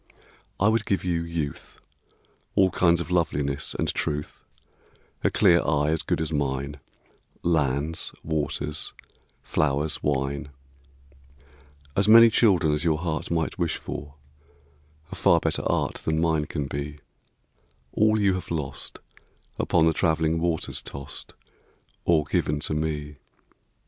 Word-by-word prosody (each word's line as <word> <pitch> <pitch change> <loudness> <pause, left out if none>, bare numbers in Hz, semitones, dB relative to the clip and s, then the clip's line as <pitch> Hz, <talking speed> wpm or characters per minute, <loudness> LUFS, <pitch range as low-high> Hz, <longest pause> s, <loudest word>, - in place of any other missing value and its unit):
I 100 - +4
would 110 0 +1
give 100 - 0
you 85 -2 0
youth, 85 -4 -5 0.8
All 95 -2 +4
kinds 85 -1 +3
of 85 +1 -5
loveliness 75 -5 0
and - - 0
truth, 75 0 -3 0.8
A - - +4
clear 85 0 +4
eye 75 -1 +1
as 80 - 0
good - - -1
as 80 0 -2
mine, 70 0 -2 0.6
Lands, 75 -1 0
waters, 75 -1 0 0.5
flowers, 75 +1 0
wine, 70 0 -1 1.5
As 100 +1 +2
many 115 +1 +9
children 90 -10 +3
as 75 - -1
your 80 -2 +2
heart 80 -1 -3
Might 80 +1 -1
wish 85 -2 0
for, 70 0 -7 1.0
a - - -5
far - - +4
better - - 0
art - - 0
Than 80 0 -1
mine 80 -2 +1
can 75 -1 -3
be, 70 +2 -5 0.9
all 110 0 +3
you 100 -2 +3
have 90 - -5
lost 75 -5 -4 0.6
Upon 85 -2 +3
the 80 - +3
travelling 80 -1 +1
waters 85 -1 -1
tossed, 70 0 -7 0.7
Or 80 -3 +4
given 75 0 0
to - - 0
me. 75 -1 -3
80 Hz, 130 wpm, -25 LUFS, 75-85 Hz, 1.5 s, many